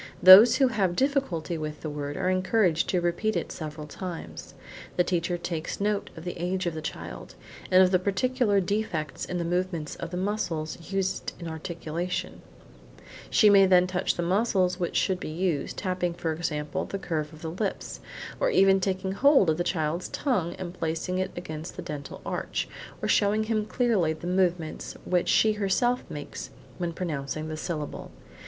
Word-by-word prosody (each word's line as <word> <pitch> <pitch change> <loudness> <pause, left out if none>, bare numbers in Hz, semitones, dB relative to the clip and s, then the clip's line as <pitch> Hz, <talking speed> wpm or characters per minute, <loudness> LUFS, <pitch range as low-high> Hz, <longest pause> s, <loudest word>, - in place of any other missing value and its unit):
Those 205 +6 +11
who 265 0 +4
have 195 -6 0
difficulty 195 - 0
with 150 -1 -5
the 155 - -4
word, 145 0 -4
are 190 - -3
then 185 0 +2
encouraged 185 -3 +2
to 180 - +2
repeat 175 +6 0
it - - -2
several 155 -1 -6
times. 175 +2 -7 0.4
The 180 - +4
teacher 175 0 -1
takes 170 -2 -4
note 205 0 0
of 160 - -8
the 175 - -4
age 185 +1 -1
of 170 - -1
the 160 - -5
child, 155 - -7 0.3
and 185 0 +7
of 185 - +3
the 185 - +4
particular 205 +3 +1
defects 180 -6 -2
in 180 - -3
the 170 - -2
movements 175 -3 -2
of 170 - -5
the 180 - -4
muscles 175 -4 -3
used 195 -1 -1
in 170 - -6
articulating. 170 +1 -4 0.9
She 215 - +5
may 195 -1 +7
then 180 -1 +6
touch 180 -1 -1
the 175 - -2
muscles 185 -1 +1
which 175 - -2
should 185 -1 +1
be - - -5
used, 160 -3 -1
tapping 180 -3 -1
for 165 -2 -2
example, 150 -2 -2
the 195 - -4
curve 160 -5 -3
of 155 0 -13
the 160 - -3
lips, 195 +3 -3 0.4
or - - +2
even 195 - +5
taking 190 0 -1
hold 205 - +5
of 155 - -1
the 175 - 0
child's 165 -1 -1
tongue 190 - -1
and 180 -2 -6
placing 170 +2 -2
it 185 0 -1
against 160 -2 -6
the 180 - -6
dental 150 -5 -7
arch, - - -2 0.4
or - - +1
showing 210 +1 +3
him 215 -1 -1
clearly 215 -12 +2
the 160 - -10
movements 180 -3 0
which 180 -1 +1
she 220 - +5
herself 215 +4 +1
makes 145 -1 -7 0.3
when 175 -1 -1
pronouncing 155 -2 -4
the 155 - -4
syllable. 155 -2 -5
180 Hz, 180 wpm, -27 LUFS, 160-195 Hz, 0.9 s, Those